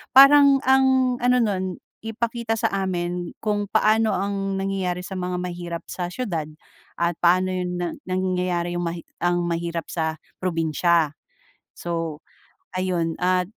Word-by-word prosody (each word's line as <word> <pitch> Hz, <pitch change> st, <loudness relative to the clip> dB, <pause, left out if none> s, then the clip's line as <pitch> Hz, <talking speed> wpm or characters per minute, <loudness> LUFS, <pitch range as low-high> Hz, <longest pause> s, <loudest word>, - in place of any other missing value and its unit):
parang 275 Hz, 0 st, +8 dB
ang 265 Hz, -1 st, +4 dB
ano 250 Hz, 0 st, +4 dB
nun, 190 Hz, -3 st, -1 dB, 0.3 s
ipakita 225 Hz, 0 st, -2 dB
sa -, -, +2 dB, 0.2 s
amin 175 Hz, -1 st, -2 dB
kung 210 Hz, -1 st, 0 dB
paano 220 Hz, 0 st, +3 dB
ang 195 Hz, 0 st, -2 dB
nangyayari 185 Hz, -2 st, -2 dB
sa 190 Hz, -, -6 dB
mga 180 Hz, 0 st, -2 dB
mahirap 175 Hz, -1 st, -5 dB
sa 180 Hz, -1 st, -3 dB
siyudad 175 Hz, -10 st, -3 dB, 0.5 s
at 170 Hz, -1 st, +1 dB
paano 185 Hz, +2 st, +4 dB
yun 180 Hz, -1 st, -2 dB
na 175 Hz, -2 st, -2 dB, 0.2 s
nangyayari 180 Hz, -2 st, -1 dB
yung -, -, -2 dB
mahi 170 Hz, 0 st, -5 dB, 0.2 s
ang 175 Hz, 0 st, +2 dB
mahirap 170 Hz, -1 st, -2 dB
sa 160 Hz, -1 st, -1 dB, 0.3 s
probinsiya. 165 Hz, -2 st, +2 dB, 0.6 s
So, 165 Hz, -3 st, -3 dB, 0.6 s
ayun 175 Hz, -3 st, 0 dB
at 180 Hz, 0 st, +2 dB
180 Hz, 130 wpm, -23 LUFS, 170-205 Hz, 0.6 s, parang